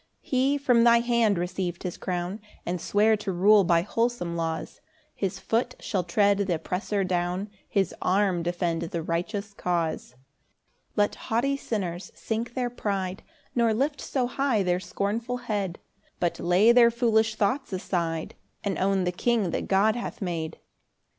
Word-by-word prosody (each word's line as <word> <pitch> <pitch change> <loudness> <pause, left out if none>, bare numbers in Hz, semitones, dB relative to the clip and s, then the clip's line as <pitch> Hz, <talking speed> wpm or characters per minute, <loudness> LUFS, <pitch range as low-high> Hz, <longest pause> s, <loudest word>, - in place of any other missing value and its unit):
3 - - -23
He 265 +2 +2
from 245 -4 +4
thy 235 0 +6
hand 235 -4 +2
receiv'd 175 0 -3
his 180 - -3
crown, 180 +3 -3 0.2
And 175 -1 -2
sware 215 +2 +3
to 210 -2 -3
rule 200 +3 +5
by 170 -1 +3
wholesome 230 -5 -1
laws 165 -1 -3 0.3
His 195 -3 -2
foot 245 +2 -1
shall 190 -4 -1
tread 200 +3 +3
th' 200 -1 -1
oppressor 180 +4 -1
down, 180 +2 -1 0.2
His 195 -4 +1
arm 190 -2 +2
defend 175 -1 -1
the 170 0 -3
righteous 200 +5 -3
cause. 170 -8 -2
4 - - -28 0.8
Let 205 0 +2 0.2
haughty 245 +5 +2
sinners 190 -9 -4
sink 230 +2 -3
their 250 -2 -1
pride, 195 -5 -3 0.3
Nor 230 -2 +2
lift 285 +5 0
so 260 -3 -1
high 250 -4 +1
their 180 -1 +1
scornful 225 +6 -2
head; 205 -7 -3 0.4
But 175 -1 0
lay 185 +6 +5
their 235 -1 +7
foolish 225 -2 +2
thoughts 255 +6 0
aside, 170 -4 -2 0.3
And 200 -2 -1
own 195 0 +2
the 180 - 0
king 210 0 +1
that - - -2
God 205 +3 +3
hath 240 - -5
made. 170 -5 -3
200 Hz, 160 wpm, -26 LUFS, 175-230 Hz, 0.8 s, their